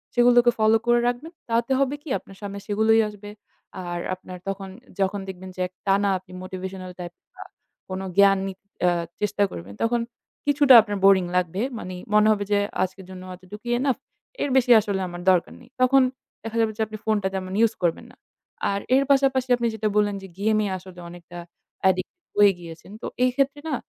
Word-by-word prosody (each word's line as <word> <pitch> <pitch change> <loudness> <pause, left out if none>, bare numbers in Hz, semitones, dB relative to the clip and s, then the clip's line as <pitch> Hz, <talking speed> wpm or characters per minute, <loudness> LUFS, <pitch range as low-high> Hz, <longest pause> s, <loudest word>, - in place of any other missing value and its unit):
সেগুলোকে 240 0 +5
follow 220 +1 +4
করে 240 0 +5
রাখবেন। 245 +7 -3 0.2
তাতে 235 +3 0
হবে 275 +1 +1
কি? 300 - -10
আপনার 195 - -16
সামনে 200 0 -6
সেগুলোই 220 +2 +3
আসবে। 205 0 -11 0.6
আর 175 0 -3 0.2
আপনার 185 0 -10
তখন 195 0 -4 0.2
আ - - -25
যখন 195 +1 0
দেখবেন 190 0 -8
যে 185 - 0 0.2
টানা 200 +1 +3
আপনি 185 - -20
motivational 185 0 -6
type 175 0 -7 0.2
বা - - -9 0.5
কোন 185 0 -4 0.2
জ্ঞান 200 -1 +6
নি 195 - -4 0.3
অ্যা 175 -1 +4 0.3
চেষ্টা 210 0 +1
করবেন, 90 +4 -8
তখন 235 +1 +1 0.4
কিছুটা 285 -2 +5
আপনার 205 -2 -4
boring 190 -2 +5
লাগবে। 180 +3 -1 0.2
মানি 185 0 -6 0.2
মনে 210 0 +5
হবে 205 -1 +1
যে 205 - +4 0.2
আজকের 190 0 -5
জন্য 185 0 -9
এতটুকুই 210 +6 -8
enough, 270 -1 0 0.4
এর 285 - 0
বেশি 250 -1 +3
আসলে 200 -2 -2
আমার 175 0 -7
দরকার 180 -2 +1
নেই। - - -18
তখন 270 +1 +5 0.4
দেখা 225 0 -5
যাবে 220 -1 +1
যে 225 - -2
আপনি 215 0 -7
phone 215 -1 +1
টা - - +2
তেমন 185 -1 -4
use 225 - -2
করবেন 165 -1 0
না। - - -20 0.6
আর 200 - -1 0.2
এর 275 - +4
পাশাপাশি 265 -2 +3
আপনি 235 -1 -1
যেটা 215 0 -1
বললেন 205 -1 +2
যে - - -8
game 215 +1 +2
এ - - -1
আসলে 180 -1 -13
অনেকটা 175 0 -11 0.5
addict 185 0 -1 0.3
হয়ে 205 -1 +7
গিয়েছেন। 170 +2 -11
তো - - -6 0.2
এই 255 - +3
ক্ষেত্রে 275 +1 +1
না, 285 - 0
205 Hz, 195 wpm, -24 LUFS, 185-235 Hz, 0.6 s, হয়ে